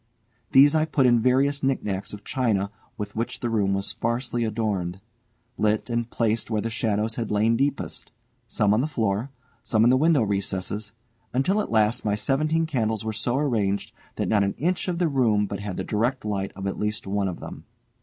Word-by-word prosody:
These 145 +2 +7
I 155 0 +3
put 145 -4 +2
in 120 -1 +5
various 135 +3 +2
knick 135 -1 0
knacks 95 -1 -3
of 105 0 -9
china 105 -7 0 0.3
with 105 -1 -5
which 115 +2 -2
the 120 - -2
room 100 -3 +2
was 100 0 -2
sparsely 120 +1 -2
adorned, 105 -5 -2 0.6
lit 110 +3 +1
and 120 0 -1
placed 115 -1 0
where 110 -2 0
the 115 +2 -2
shadows 110 -1 -1
had 115 -2 -2
lain 110 +2 +2
deepest, 140 +2 -2 0.4
some 105 -3 +2
on 110 - +3
the 145 - 0
floor, 115 -3 -1 0.3
some 110 -1 +2
in 120 - +6
the 130 - +5
window 155 -3 +4
recesses, 100 +1 -2 0.4
until 190 +11 +2
at - - -5
last 110 +1 +2
my 105 -1 +1
seventeen 155 +8 +1
candles 110 -8 -1
were 110 - -2
so 120 +4 0
arranged 110 -9 0 0.2
that - - -1
not 105 -2 +3
an 100 - -1
inch 180 +5 0
of 180 -2 -1
the 175 -1 +2
room 115 -8 +2
but 100 -1 -5
had 100 -2 -5
the - - -2
direct 120 +4 -1
light 100 -2 -2
of 95 0 -6
at 95 - -3
least 105 0 -2
one 100 0 0
of 90 - -4
them. - - -9
110 Hz, 205 wpm, -25 LUFS, 105-130 Hz, 0.6 s, These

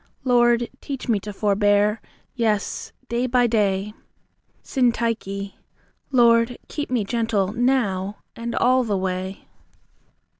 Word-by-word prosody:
Lord, 240 -2 +3
teach 275 -2 -6
me 225 -4 +2
to 210 +2 -7
forbear; 205 +1 +2 0.3
yes, 220 -5 -1 0.2
day 240 +2 -1
by 245 0 +3
day. 210 -3 +1 0.7
SYNTYCHE. 230 -6 -1 0.6
Lord, 235 -1 +4
keep 295 -1 -4
me 245 -4 +1
gentle 225 -3 0
now, 210 -6 0 0.2
and 235 0 -4
all 255 +1 +3
the 210 -4 -1
way. 185 +1 -4
230 Hz, 110 wpm, -23 LUFS, 200-240 Hz, 0.7 s, Lord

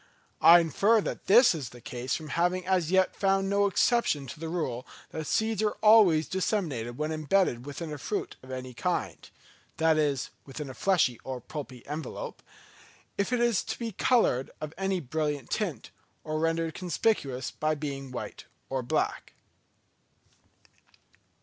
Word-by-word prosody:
I 170 +1 +9
infer 200 +8 +3
that - - -5
this 235 +4 +7
is 145 -7 -5
the 120 - -13
case 125 +2 -3
from 155 -2 -6
having 180 +4 0
as 180 -4 +1
yet 190 0 +3
found 195 0 +1
no 200 0 +3
exception 195 - +2
to 135 - -9
the 165 0 -4
rule 140 -7 -3 0.2
that 155 -1 -5
seeds 220 0 +1
are 215 -1 0
always 205 -8 +6
thus - - -19
disseminated 155 - -1
when 155 +1 -2
embedded 155 -4 +1
within 150 +2 -5
a 150 - -7
fruit 205 +9 -3
of 130 - -15
any 130 -1 -6
kind - - -3 0.5
(that 160 -1 +3
is 145 -3 0
within 140 0 -7
a - - -9
fleshy 155 - +2
or 130 -1 -5
pulpy 130 -2 -8
envelope), 150 -1 -6 0.7
if 200 +3 -1
it 240 -6 +2
be 230 -1 -4
coloured 200 - +2
of 155 0 -6
any 195 0 -1
brilliant 150 -2 -3
tint, 175 - -2 0.3
or 155 0 -2
rendered 165 0 0
conspicuous 155 - -1
by 155 0 -1
being 140 -2 -5
white 125 -1 -7 0.3
or 135 -1 0
black. 120 - -2
160 Hz, 155 wpm, -28 LUFS, 135-195 Hz, 0.7 s, I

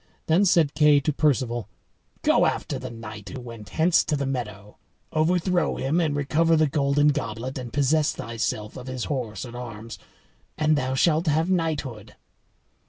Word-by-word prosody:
Then 170 +6 +3
said 165 -6 +3
Kay 150 -2 +5
to 150 +2 0
Perceval, 125 -6 0 0.5
"Go - - +4
after - - -2
the 130 - -6
knight 110 -3 -9
who 110 - -7
went 115 -4 -10
hence 165 - +3
to 155 - 0
the 140 - -2
meadow, 105 -6 -5 0.4
overthrow 175 +3 +1
him 150 +6 0
and 155 -3 0
recover 155 +4 +2
the 155 0 +4
golden 145 0 +2
goblet, 125 0 -3
and 120 -2 -7
possess 145 +2 +2
thyself 110 -1 -4
of 125 - -9
his 130 -2 -4
horse 120 -7 -3
and 120 -1 -9
arms, 115 -2 -8 0.6
and 155 0 +3
thou 130 -2 -1
shalt 160 +4 +2
have 160 +4 +2
knighthood." 150 - -2
140 Hz, 165 wpm, -25 LUFS, 115-155 Hz, 0.6 s, Kay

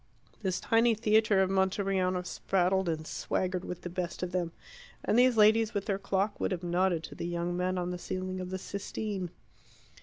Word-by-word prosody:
This 185 -3 -1
tiny 230 0 +3
theatre 215 -2 +4
of 190 - -1
Monteriano 190 -1 +1
spraddled 190 +1 +1
and 160 -1 -2
swaggered 185 +2 -2
with 180 - -6
the 175 - -5
best 180 0 -3
of 180 - -3
them, 175 -2 -1 0.5
and - - +2
these 250 -2 +5
ladies 215 +1 +5
with 200 - -1
their 195 -3 -1
clock 200 +1 -1
would - - 0
have 180 -1 -3
nodded 175 -1 +1
to - - -8
the 170 - -4
young 175 0 -2
men 185 +1 0
on 180 0 -1
the 180 - -4
ceiling 185 +1 -4
of 180 0 -5
the 190 - -3
Sistine. 200 -1 -4
185 Hz, 190 wpm, -30 LUFS, 180-200 Hz, 0.5 s, these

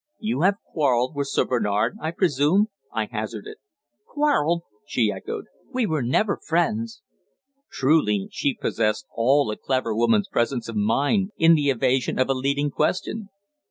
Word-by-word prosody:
"You 225 -3 -2
have 195 +3 +4
quarrelled 130 -3 0
with 140 -1 -1
Sir - - +1
Bernard, 110 -2 0
I 160 - -1
presume?" 170 +4 +2 0.2
I - - -1
hazarded. 425 0 -6 0.5
"Quarrelled!" 175 - +1 0.2
she - - +1
echoed. - - -6 0.3
"We 255 -2 0
were 160 -7 -1
never 165 - +1
friends." 220 +8 -1 0.7
Truly 130 -8 +2
she 140 - -1
possessed 110 +2 -1
all 130 +1 +2
a 105 - -5
clever 130 -4 -1
woman's 115 -2 +2
presence 120 0 -1
of 115 - -6
mind 145 - +1
in 165 0 +6
the 145 -3 +2
evasion 130 0 +1
of 130 +1 +1
a - - +4
leading 140 +2 0
question. 195 +8 -1
145 Hz, 150 wpm, -24 LUFS, 120-180 Hz, 0.7 s, in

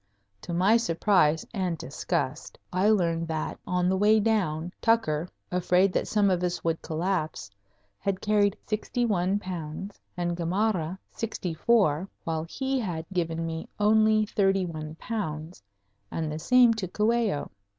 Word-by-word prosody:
To - - -7
my 190 +6 +4
surprise 170 -6 +2
and 185 -5 -1
disgust 140 0 -3 0.2
I 185 +3 +3
learned 170 -5 +2
that 160 -1 -3
on 180 0 +1
the 190 - +2
way 210 +3 +4
down 180 -6 0
Tucker, 180 -8 +2 0.2
afraid 180 +1 +3
that - - 0
some 205 -2 +3
of 180 -1 +1
us 180 -1 -2
would 165 -1 0
collapse, 155 - -2 0.5
had 195 -1 -1
carried 205 -2 +2
sixty 220 +3 -1
one 195 -2 +1
pounds, 185 0 -6 0.2
and 175 -1 -1
Gamarra 180 0 0
sixty 200 -6 -4
four, 190 -2 +2
while 160 -1 -2
he 265 +3 -1
had 175 -8 -3
given 165 -2 -1
me 165 0 -5
only 215 +1 +4
thirty 195 -3 +2
one 155 -2 -6
pounds, 160 - -5 0.5
and 160 -2 -3
the 155 - -4
same 250 +4 +5
to 210 -4 -3
Coello. 215 -4 0
180 Hz, 145 wpm, -27 LUFS, 165-210 Hz, 0.5 s, same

